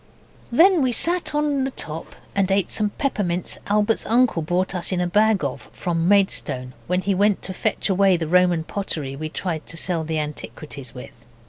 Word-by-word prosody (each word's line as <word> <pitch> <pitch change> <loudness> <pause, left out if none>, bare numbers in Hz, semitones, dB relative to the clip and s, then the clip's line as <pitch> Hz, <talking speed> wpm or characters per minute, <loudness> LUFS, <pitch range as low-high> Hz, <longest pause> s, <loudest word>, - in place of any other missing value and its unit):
Then 345 +7 +5
we 260 -2 +2
sat 340 +5 +2
on 295 -2 +1
the 265 - -1
top 160 - -7 0.2
and 195 -1 +1
ate 195 -2 +1
some 210 -1 +1
peppermints 205 -8 -2
Albert's 210 +2 +2
uncle 235 -6 +3
brought 180 +4 -1
us 180 0 -1
a 180 -1 0
bag 210 +1 +2
of 135 -2 -4
from 170 -1 -1
Maidstone 180 -10 +1
when 180 +1 +1
he 200 +1 0
went 205 +1 +2
to 190 - -5
fetch 215 +3 -1
away 195 -1 +3
the 165 -2 -3
Roman 180 -1 +3
pottery 155 -7 -4
we 155 +2 -5
tried 165 -1 -4
to 165 - -6
sell 170 -2 0
the 160 0 -2
Antiquities 150 -3 -5
with. 125 -1 -11
185 Hz, 185 wpm, -22 LUFS, 160-210 Hz, 0.2 s, Then